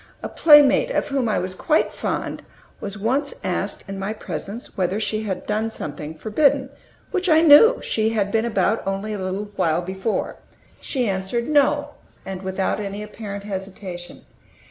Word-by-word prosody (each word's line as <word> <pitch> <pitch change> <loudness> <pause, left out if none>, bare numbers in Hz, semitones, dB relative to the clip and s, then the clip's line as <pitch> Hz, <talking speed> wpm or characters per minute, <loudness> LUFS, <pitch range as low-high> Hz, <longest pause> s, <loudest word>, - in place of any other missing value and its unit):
A - - -3
playmate, 295 - +6
of - - -1
whom 270 -4 0
I 210 - +1
was 185 +1 -2
quite 305 - +1
fond, - - -3 0.4
was 200 0 -5
once 260 - 0
asked, - - -2
in 195 0 -6
my 195 +2 -2
presence, 200 +3 -7
whether 185 +2 0
she 215 0 -1
had 195 -4 -4
done 215 +2 -1
something 160 -7 -6
forbidden, 265 - +1 0.4
which 375 -2 0
I 315 0 +6
knew 335 +11 +8
she 220 0 0
had 205 -3 0
been 225 - +2
about 215 -1 +1
only 195 +2 -2
a 205 - -4
little 190 +2 -4
while 165 +2 +1
before. 190 +4 -3 0.4
She 255 -4 -1
answered 195 +5 -2
"No," 290 0 +3 0.4
and 190 -1 -5
without 190 +1 -1
any 205 0 -4
apparent 205 -1 -7
hesitation. 190 -3 -7
210 Hz, 165 wpm, -22 LUFS, 190-260 Hz, 0.4 s, knew